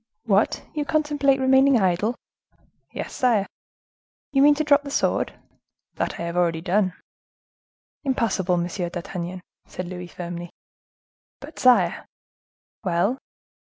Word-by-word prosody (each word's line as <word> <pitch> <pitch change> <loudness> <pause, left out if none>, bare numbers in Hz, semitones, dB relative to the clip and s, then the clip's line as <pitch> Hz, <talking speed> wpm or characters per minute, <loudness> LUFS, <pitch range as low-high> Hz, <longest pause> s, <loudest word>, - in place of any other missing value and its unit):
"What! 205 -1 +2
you 300 - -1
contemplate 290 -3 +1
remaining 265 0 +5
idle?" 190 +5 +1 0.8
"Yes, - - -6
sire." 230 -6 +2 0.9
"You 270 - +4
mean 290 +1 +7
to 310 - 0
drop 285 -1 +4
the 285 - -8
sword?" - - 0 0.6
"That - - -2
I - - -3
have 170 0 -4
already 170 -2 +1
done." 185 +2 +1 1.1
"Impossible, 215 - 0
Monsieur 175 +1 -2
d'Artagnan," 180 +1 -5 0.3
said 180 - -6
Louis, 180 0 -7
firmly. 175 0 -7 0.9
"But, 290 +3 -11
sire—" 195 -8 +4 0.8
"Well?" 195 +7 +1
200 Hz, 120 wpm, -24 LUFS, 175-270 Hz, 1.1 s, mean